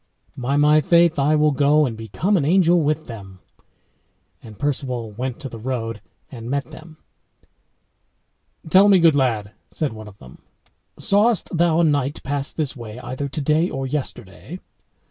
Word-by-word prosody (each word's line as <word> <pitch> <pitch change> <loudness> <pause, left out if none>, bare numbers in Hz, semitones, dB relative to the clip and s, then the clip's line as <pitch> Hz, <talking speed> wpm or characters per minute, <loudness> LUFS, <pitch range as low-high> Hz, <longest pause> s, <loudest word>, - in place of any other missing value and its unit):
"By 130 +3 -1
my 150 +1 +4
faith, 170 0 +3
I 145 +3 +3
will 150 0 +3
go 145 +2 +3
and 120 -4 -4
become 115 - -1
an 165 - +1
angel 175 +2 +3
with 155 +1 -1
them." 100 -5 -10 1.0
And 110 -3 -13
Perceval 125 -5 -3
went 125 +3 -5
to 140 - -5
the 115 -3 -9
road 115 -2 -4 0.3
and 120 -2 -8
met 140 +3 -3
them. 160 +1 -13 1.7
"Tell 190 +5 +6
me, 195 - +6
good 165 -3 +5
lad," 115 -7 0 0.2
said 150 -7 -3
one 110 -1 -10
of 100 -1 -14
them, 65 -6 -15 0.6
"sawest 205 -1 +1
thou 170 0 +2
a - - +3
knight 145 -2 0
pass 140 0 -1
this 150 -3 -2
way 115 -3 -9
either 130 +3 -5
today 155 +4 0
or 135 0 -4
yesterday?" 130 - -6
140 Hz, 160 wpm, -21 LUFS, 120-155 Hz, 1.7 s, Tell